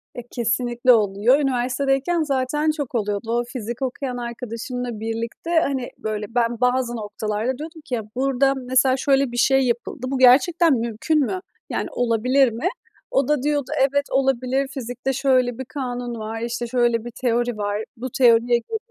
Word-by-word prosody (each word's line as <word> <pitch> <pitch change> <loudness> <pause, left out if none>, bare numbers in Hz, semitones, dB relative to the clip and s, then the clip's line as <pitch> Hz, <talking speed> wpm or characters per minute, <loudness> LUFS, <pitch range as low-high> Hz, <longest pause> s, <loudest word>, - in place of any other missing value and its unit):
E, 245 - -5
kesinlikle 240 +1 +2
oluyor. 215 +5 +3
Üniversitedeyken 270 +4 0
zaten 295 +2 0
çok 290 -5 -5
oluyordu. 210 +1 -1
O 240 +1 +1
fizik 240 0 -6
okuyan 255 -1 -3
arkadaşımla 235 0 -5
birlikte, 225 +8 -4
hani, 265 -3 -2
böyle, 215 -1 -3
ben 235 -1 0
bazı 250 -1 +1
noktalarda 215 +3 -3
diyordum 320 +1 -8
ki 250 - -2
ya, 225 - -3
burada, 270 +1 +2
mesela, 260 0 +2
şöyle 270 -1 +2
bir 240 - -5
şey 270 +2 +4
yapıldı. 240 +1 -3
Bu 270 - -1
gerçekten 290 +6 +5
mümkün 235 +6 0
mü? 370 +7 -3 0.3
Yani, - - -2
olabilir 245 +2 +2
mi? 235 +10 -2 0.4
O 270 -1 +2
da 295 -3 +1
diyordu, 290 -3 0
evet, 280 +1 +2
olabilir, 265 0 +1
fizikte 255 -1 -4
şöyle 255 -2 +2
bir 260 - -5
kanun 245 -3 -5
var, 220 +1 -5
işte, 240 0 -3
şöyle 240 -2 +1
bir 240 - -6
teori 240 -1 -1
var, 205 +1 -2
bu 255 +3 -4
teoriye 240 -1 +5
göre, 445 - -1
250 Hz, 160 wpm, -22 LUFS, 235-270 Hz, 0.4 s, gerçekten